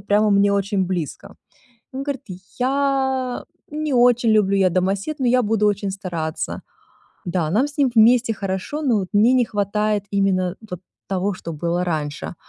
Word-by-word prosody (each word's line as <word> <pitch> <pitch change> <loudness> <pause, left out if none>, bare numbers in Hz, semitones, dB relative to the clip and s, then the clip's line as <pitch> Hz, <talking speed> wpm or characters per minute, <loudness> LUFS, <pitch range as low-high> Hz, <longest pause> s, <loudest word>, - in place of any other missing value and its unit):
прямо 205 +2 +2
мне 200 0 +4
очень 200 -1 0
близко. 175 -5 -5 0.6
И - - -6
он 275 - -3
говорит: 280 -3 -4 0.4
"Я 265 -1 0 0.3
не 305 -2 -2
очень 240 -2 +4
люблю, 200 -2 +3
я 190 -1 +4
домосед, 195 - -1
но 255 - +1
я 250 0 +3
буду 210 0 +1
очень 200 -1 -1
стараться". 175 -5 -4 0.7
Да, 170 -3 -1
нам 245 - +2
с 290 - -15
ним 270 -3 +3
вместе 230 +1 +5
хорошо, 195 +10 -4
но 250 -6 +2
вот 185 - -5
мне 220 +5 +4
не 250 - +4
хватает 210 -1 -1
именно 190 -2 0
вот 180 -1 -6 0.3
того, 195 +1 -1
что 170 -3 -7
было 170 +3 -1
раньше. 155 -1 -3
205 Hz, 170 wpm, -21 LUFS, 185-245 Hz, 0.7 s, вместе